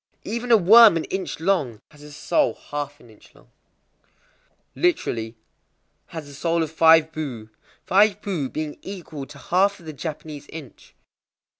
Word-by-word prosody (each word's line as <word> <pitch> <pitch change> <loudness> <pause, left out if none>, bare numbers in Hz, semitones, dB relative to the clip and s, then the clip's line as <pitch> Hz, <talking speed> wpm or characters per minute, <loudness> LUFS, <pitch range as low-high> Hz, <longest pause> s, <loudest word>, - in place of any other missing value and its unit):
_ - - -44
Even 235 +3 -4
a 230 - +8
worm 215 0 +7
an 160 - -2
inch 190 -4 -4
long 160 - 0
has 150 -1 -18
a 150 0 -12
soul 145 - 0 0.2
half 145 0 -4
an 120 - -18
inch 110 - -21
long. - - -22 1.2
Literally, 115 - -1 0.7
"has 160 -3 -8
a 145 - -12
soul 165 +3 0
of 155 - -5
five 160 0 +5
bu,"—five 155 - -1
bu 165 -10 -3
being 155 -1 -5
equal 165 -8 -8
to 145 - -13
half 195 +6 +1
of 170 - -16
the 155 - -7
Japanese 150 -1 -7
inch. 155 -6 -12
160 Hz, 155 wpm, -23 LUFS, 145-190 Hz, 1.2 s, a